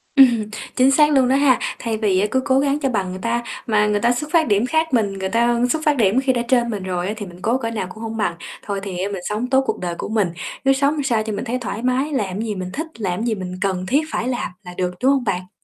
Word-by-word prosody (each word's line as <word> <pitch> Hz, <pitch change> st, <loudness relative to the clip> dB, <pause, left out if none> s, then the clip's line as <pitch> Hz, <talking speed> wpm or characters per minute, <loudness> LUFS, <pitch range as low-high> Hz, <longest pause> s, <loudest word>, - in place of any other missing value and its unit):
Ừm, 240 Hz, -6 st, +6 dB, 0.3 s
chính 260 Hz, +1 st, +5 dB
xác 300 Hz, +2 st, +5 dB
luôn 265 Hz, -3 st, +4 dB
đó 265 Hz, -, +3 dB
ha. 275 Hz, -3 st, +4 dB, 0.2 s
Thay 225 Hz, -2 st, -2 dB
vì 205 Hz, -4 st, +2 dB
á 205 Hz, -, +2 dB
cứ 260 Hz, -, +2 dB
cố 265 Hz, -1 st, +3 dB
gắng 280 Hz, +1 st, +1 dB
cho 270 Hz, -3 st, 0 dB
bằng 195 Hz, -6 st, -1 dB
người 185 Hz, -, -6 dB
ta, 235 Hz, +1 st, -1 dB, 0.2 s
mà 210 Hz, -1 st, +3 dB
người 205 Hz, 0 st, +1 dB
ta 235 Hz, +3 st, +3 dB
xuất 300 Hz, +5 st, -3 dB
phát 330 Hz, -3 st, +3 dB
điểm 205 Hz, +1 st, +2 dB
khác 320 Hz, +2 st, 0 dB
mình, 210 Hz, -5 st, +2 dB
người 190 Hz, 0 st, -2 dB
ta 235 Hz, +2 st, +2 dB
xuất 310 Hz, +4 st, 0 dB
phát 295 Hz, -2 st, +3 dB
điểm 220 Hz, +1 st, +3 dB
khi 270 Hz, -1 st, +2 dB
đã 240 Hz, -, 0 dB
trên 240 Hz, -2 st, +2 dB
mình 205 Hz, -4 st, -4 dB
rồi 180 Hz, -1 st, -2 dB
á, 210 Hz, -, -2 dB
thì 205 Hz, -, -5 dB
mình 180 Hz, -1 st, -12 dB
cố 235 Hz, +3 st, +1 dB
cỡ 230 Hz, -3 st, -3 dB
nào 210 Hz, -5 st, -3 dB
cũng 220 Hz, +5 st, -9 dB
hông 225 Hz, 0 st, -4 dB
bằng. 210 Hz, -5 st, 0 dB, 0.3 s
Thôi 200 Hz, -1 st, -2 dB
thì 190 Hz, -3 st, -5 dB
á 200 Hz, -, -1 dB
mình 190 Hz, -, -4 dB
sống 215 Hz, +4 st, -2 dB
tốt 265 Hz, 0 st, +4 dB
cuộc -, -, -1 dB
đời 175 Hz, -1 st, -3 dB
của -, -, -5 dB
mình, 215 Hz, -5 st, +1 dB, 0.4 s
cứ 270 Hz, -, +5 dB
sống 285 Hz, +2 st, +1 dB
sao 230 Hz, -4 st, +1 dB
cho 220 Hz, -, -4 dB
mình 205 Hz, +5 st, -4 dB
thấy 245 Hz, +2 st, -1 dB
thoải 225 Hz, -2 st, -4 dB
mái, 255 Hz, +4 st, +1 dB
làm 205 Hz, -7 st, -2 dB
gì 215 Hz, -3 st, -3 dB
mình 185 Hz, -1 st, -4 dB
thích, 320 Hz, +3 st, -3 dB
làm 190 Hz, +1 st, -2 dB
gì 230 Hz, -2 st, 0 dB
mình 185 Hz, -1 st, -6 dB
cần 185 Hz, -2 st, -1 dB
thiết 275 Hz, +9 st, +2 dB
phải 240 Hz, -, -2 dB
làm 245 Hz, -5 st, -2 dB
là 180 Hz, 0 st, -9 dB
được, 180 Hz, -1 st, 0 dB
đúng 265 Hz, -, +5 dB
hông 275 Hz, -3 st, +1 dB
bạn? 185 Hz, -3 st, -2 dB
230 Hz, 295 wpm, -21 LUFS, 195-265 Hz, 0.4 s, Ừm